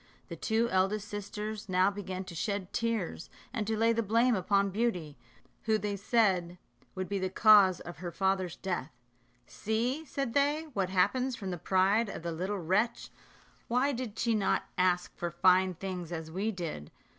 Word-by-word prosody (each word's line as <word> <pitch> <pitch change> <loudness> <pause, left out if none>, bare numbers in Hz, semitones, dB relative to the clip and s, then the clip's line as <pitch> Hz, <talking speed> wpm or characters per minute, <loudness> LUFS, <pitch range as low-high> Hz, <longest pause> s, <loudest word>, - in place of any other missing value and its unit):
The - - -5
two 225 +1 +1
eldest 195 +2 +1
sisters 210 0 -5
now 185 +2 +3
began 190 -2 -5
to 185 - -10
shed 195 +2 -3
tears, 230 -8 -2 0.2
and 210 - -2
to 220 -1 0
lay 230 +1 +3
the 230 - +1
blame 230 +4 +3
upon 200 0 +1
Beauty, 185 -9 -1 0.5
who 220 -1 +3
they 205 -1 -2
said 190 -4 +1 0.4
would 185 -1 -3
be 200 -1 -2
the 185 0 -1
cause 200 -2 +6
of 175 - -9
her 175 0 -5
father's 190 -1 0
death 180 -7 -3 0.6
"See," 235 - -2
said 275 -5 -3
they, 290 +3 +2
"what 195 -4 0
happens 250 +8 +1
from 195 -5 -5
the 175 - -3
pride 195 +6 +2
of 165 - -7
the 170 - -2
little 185 +5 -2
wretch. 190 +7 0 0.6
Why 250 +4 +2
did 245 -5 -5 0.2
not 205 -2 +1
she - - -30
ask 180 -1 +1
for 175 - -3
fine 185 +2 +3
things 180 -1 -5
as 160 -2 -5
we 200 +6 -1
did? 165 - -5
195 Hz, 175 wpm, -30 LUFS, 185-220 Hz, 0.6 s, cause